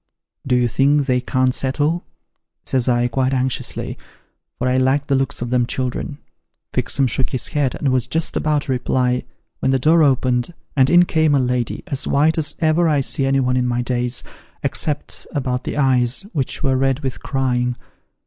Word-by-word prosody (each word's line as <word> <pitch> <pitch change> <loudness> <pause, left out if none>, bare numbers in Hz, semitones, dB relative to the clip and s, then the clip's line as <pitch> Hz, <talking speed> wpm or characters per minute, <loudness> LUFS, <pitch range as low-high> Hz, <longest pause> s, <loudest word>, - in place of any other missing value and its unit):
' - - -19
Do 125 - +2
you 125 -1 +3
think 140 +4 +2
they 125 -2 +1
can't 130 0 +1
settle? 145 +7 0 0.3
' - - -55
says 130 -1 +1
I, 120 0 +2
quite 130 +2 0
anxiously; 130 0 -2 0.6
for 125 - -1
I 125 0 +2
liked 135 +2 +1
the 140 - +3
looks 135 -2 -1
of 120 - -5
them 125 -1 +2
children. 130 +3 -3 0.6
Fixem 135 - +1
shook 130 +2 -1
his 130 - -1
head, 145 -4 0
and 140 - -1
was 130 -2 +1
just 165 0 -1
about 150 -2 +1
to 140 - -4
reply, 125 0 0 0.3
when - - 0
the 135 - +3
door 160 +6 +4
opened, 130 +1 +1 0.2
and 135 -1 +4
in 175 +1 +6
came 160 -3 +2
a - - +3
lady, 125 -2 -1
as 140 - -5
white 155 +3 +2
as 150 -1 0
ever 165 0 +2
I 145 -2 +2
see 135 0 +1
anyone 130 -2 +1
in 125 -1 +1
my 120 0 -1
days, 125 0 -1 0.4
except 150 -1 -1
about 125 -2 -2
the - - -4
eyes, 130 -2 +2
which 140 0 -2
were 135 -2 +2
red 135 +1 +1
with 130 -3 -4
crying. 125 -2 -1
130 Hz, 190 wpm, -20 LUFS, 125-145 Hz, 0.6 s, in